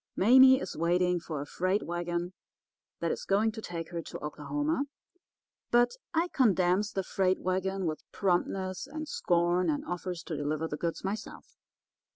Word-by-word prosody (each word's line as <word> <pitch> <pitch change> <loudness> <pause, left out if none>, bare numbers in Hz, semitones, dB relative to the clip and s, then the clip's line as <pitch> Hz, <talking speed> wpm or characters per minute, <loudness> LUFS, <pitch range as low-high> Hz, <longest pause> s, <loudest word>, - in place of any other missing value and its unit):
Mame 260 +5 +7
is 185 - -5
waiting 180 +2 +2
for 155 -3 -5
a - - -5
freight 185 +7 0
wagon 175 +1 -3 0.7
that - - 0
is - - -3
going 210 +3 +2
to 220 0 -7
take 170 -4 -6
her 170 -1 -3
to - - -8
Oklahoma, 285 - -2 0.8
but 240 0 +4 0.2
I 335 +2 +1
condemns 200 - +2
the 195 - -1
freight 185 0 +1
wagon 190 +1 -1
with 155 -2 -4
promptness 185 0 -1
and 310 +1 -6
scorn, 175 - +1
and 145 - -1
offers 175 0 -4
to 165 - -4
deliver 150 +2 -1
the 150 - -4
goods 165 +2 -3
myself. 200 +3 -6
185 Hz, 160 wpm, -30 LUFS, 170-205 Hz, 0.8 s, Mame